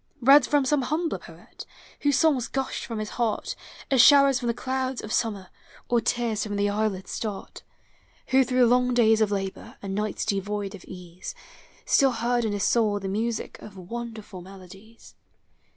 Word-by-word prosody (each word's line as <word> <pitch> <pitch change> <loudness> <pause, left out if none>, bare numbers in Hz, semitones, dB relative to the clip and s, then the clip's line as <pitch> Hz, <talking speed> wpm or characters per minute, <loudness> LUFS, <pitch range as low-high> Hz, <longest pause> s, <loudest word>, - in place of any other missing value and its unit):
Read 275 +4 +7
from 290 -2 +2
some 290 +1 +2
humbler 315 +5 -2
poet, - - -13 0.4
Whose 285 -1 +2
songs 290 -7 +2
gushed 270 -1 -3
from 230 -3 -5
his 215 -1 -4
heart 225 -3 -1 0.4
As 265 -3 +6
showers 275 -1 +6
from 240 - -4
the 235 - +1
clouds 260 0 -3
of 215 - -5
summer 205 -5 -2 0.4
Or 240 -1 +2
tears 230 -3 -1
from 205 -1 -4
the 200 0 +1
eyelids 205 -3 -2
start; 210 -3 -6 0.7
Who 265 0 +5
through 255 0 +3
long 250 +1 +2
days 225 -2 +4
of 215 - +3
labor 195 -2 -5
And 195 -1 -5
nights 210 0 -2
devoid 205 -1 -2
of 200 - -11
ease, 180 - -9 0.5
Still 270 -3 +4
heard 235 +1 0
in 215 - -1
his 200 -2 -2
soul 215 -3 +2
the 195 - -5
music 220 +3 -3
Of 200 -2 -12
wonderful 215 0 -7
melodies. 195 +4 -14
225 Hz, 170 wpm, -25 LUFS, 200-250 Hz, 0.7 s, Read